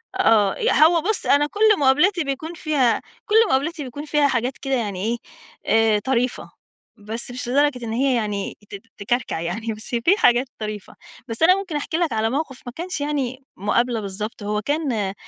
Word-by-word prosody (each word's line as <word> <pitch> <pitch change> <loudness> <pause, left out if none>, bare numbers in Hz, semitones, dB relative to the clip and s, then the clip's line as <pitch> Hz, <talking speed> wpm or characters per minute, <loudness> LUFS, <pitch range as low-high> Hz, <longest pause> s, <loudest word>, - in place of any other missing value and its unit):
آه، 215 - +3
ي - - +2
هو 320 +2 +5
بُصّ 425 +4 -1
أنا 290 +1 +4
كُلّ 425 +1 +3
مقابلاتي 300 +7 +3
بيكون 285 +4 -4
فيها 295 -7 +1 0.2
كُلّ 425 - 0
مقابلاتي 295 +4 0
بيكون 285 +4 -7
فيها 295 -1 +2
حاجات 250 0 -1
كده 270 -1 -3
يعني 205 -6 -2
إيه 235 +1 0 0.8
آآ، - - +1
طريفة، 250 +2 -1 0.5
بس 220 +4 -5
مش 245 -1 -5
لدرجة 265 -2 +1
إن 220 - -4
هي 260 +1 +2
يعني 210 -3 -3
ت - - -7 0.2
تكركع 215 -3 -1
يعني، 220 +7 -3
بس 215 +2 -9
في 335 - +3
حاجات 245 - +3
طريفة، 210 -2 -6 0.3
بس 225 +7 -2
أنا 365 +3 +7
ممكن 380 -6 -5
أحكي 305 +2 -2
لك 335 -8 0
على 220 0 +1
موقف 275 -1 -3
ما 245 - -6
كانش 345 -2 -4
يعني 275 -3 -2
مقابلة 230 +4 +1
بالضبط، 205 +3 -6
هو 210 +1 -1
كان 240 -8 -1
255 Hz, 180 wpm, -22 LUFS, 220-300 Hz, 0.8 s, أنا